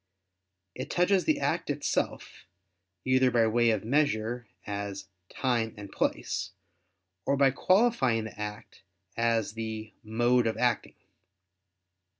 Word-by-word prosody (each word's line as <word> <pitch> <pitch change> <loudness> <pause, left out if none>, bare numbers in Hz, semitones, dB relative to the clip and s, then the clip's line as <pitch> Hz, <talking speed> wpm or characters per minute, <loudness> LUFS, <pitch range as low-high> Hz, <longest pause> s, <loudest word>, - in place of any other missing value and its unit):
It - - -6
touches 180 +2 +2
the 310 -2 +2
act 170 - -1
itself, 145 -9 -2 0.6
either 130 0 +4
by 120 -2 +3
way 115 +1 +3
of 110 -2 0
measure, 120 -3 0 0.2
as 100 -2 -5 0.2
"time" 120 -4 -1
and 100 -1 -9
"place"; - - -2 0.7
or 140 - +1
by 135 -1 +5
qualifying 185 - +3
the 110 -1 -9
act 105 +1 -7 0.3
as 115 -2 +1
the 110 -1 -5
"mode 120 +2 +2
of 110 - -1
acting." 125 -2 0
115 Hz, 120 wpm, -29 LUFS, 110-135 Hz, 0.7 s, by